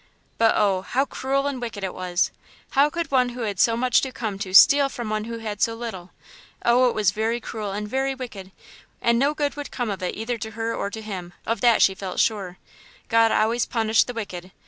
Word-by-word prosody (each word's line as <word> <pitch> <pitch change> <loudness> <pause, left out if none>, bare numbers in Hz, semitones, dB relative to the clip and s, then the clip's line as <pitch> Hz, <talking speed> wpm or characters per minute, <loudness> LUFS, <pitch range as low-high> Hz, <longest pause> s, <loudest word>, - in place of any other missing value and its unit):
But 225 0 +5
oh! 195 -3 +2
how 260 +8 0
cruel 275 0 -1
and 275 -3 -3
wicked 225 -4 -5
it 190 - -3
was! 180 -1 -1 0.4
How 280 +2 +4
could 335 0 -4
one 255 -2 +3
who 245 0 -7
had 205 -5 -3
so 230 -1 +4
much 250 0 +3
come 210 -4 -4
to 190 -2 -5
steal 280 +8 +7
from 235 -5 -5
one 215 0 -1
who 230 0 -5
had 215 -2 -6
so 230 - +2
little? 220 -7 -7 0.6
Oh, 245 +1 +5
it - - -4
was 210 -3 +2
very 220 +3 -1
cruel 215 -3 -5
and 210 +1 -4
very 270 +4 -1
wicked, 205 -7 -8 0.5
and 235 0 +2
no 285 +3 +2
good 290 -1 -1
would 290 -1 -6
come 245 -4 -3
of 195 - -5
it 180 - -3
either 230 +2 -3
to 220 +1 -5
her 230 0 -1
or 200 - -3
to 220 +2 -8
him; 185 -4 -7
of 230 - -2
that 240 -2 +5
she 190 - +4
felt 190 -1 -6
quite - - -4
sure. 195 -5 -1 0.5
God 230 -1 +4
always 230 +2 +1
punished 225 -2 +2
the 245 - -6
wicked. 185 -5 -6
225 Hz, 230 wpm, -24 LUFS, 200-245 Hz, 0.6 s, steal